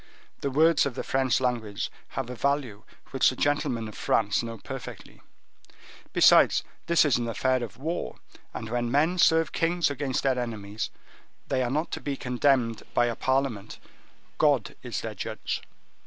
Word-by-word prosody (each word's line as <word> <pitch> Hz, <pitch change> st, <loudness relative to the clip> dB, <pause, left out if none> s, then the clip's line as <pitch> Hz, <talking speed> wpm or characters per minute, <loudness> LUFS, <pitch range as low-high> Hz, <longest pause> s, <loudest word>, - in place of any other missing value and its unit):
The 140 Hz, -, -1 dB
words 155 Hz, +2 st, +4 dB
of 130 Hz, -, -6 dB
the -, -, -3 dB
French 130 Hz, -2 st, +1 dB
language 115 Hz, -5 st, -2 dB, 0.3 s
have 135 Hz, -3 st, -1 dB
a -, -, -5 dB
value 130 Hz, -5 st, -1 dB, 0.3 s
which 135 Hz, -, +4 dB
the 130 Hz, -, -4 dB
gentlemen 125 Hz, -5 st, 0 dB
of 110 Hz, -, -9 dB
France 105 Hz, -1 st, +1 dB
know 115 Hz, -1 st, -6 dB
perfectly. -, -, -9 dB, 0.9 s
Besides, -, -, +6 dB, 0.2 s
this 170 Hz, -2 st, +5 dB
is 140 Hz, -6 st, +3 dB
an 120 Hz, -, -2 dB
affair 130 Hz, +3 st, +1 dB
of 115 Hz, -, -7 dB
war; 160 Hz, +6 st, -3 dB, 0.4 s
and 115 Hz, -, -6 dB
when 120 Hz, -1 st, 0 dB
men 155 Hz, +8 st, +2 dB
serve 165 Hz, -1 st, +4 dB
kings 170 Hz, -1 st, +1 dB
against 135 Hz, -2 st, -2 dB
their 130 Hz, -2 st, +2 dB
enemies 110 Hz, -3 st, -4 dB, 0.6 s
they 130 Hz, -1 st, +1 dB
are 125 Hz, -, 0 dB
not 155 Hz, +6 st, -1 dB
to -, -, -4 dB
be 140 Hz, -2 st, -3 dB
condemned 125 Hz, -2 st, +1 dB
by 120 Hz, -, +4 dB
a 120 Hz, -1 st, -1 dB
parliament—God 130 Hz, -6 st, -2 dB
is -, -, -4 dB
their -, -, -5 dB
judge. -, -, -4 dB
130 Hz, 160 wpm, -27 LUFS, 115-145 Hz, 0.9 s, Besides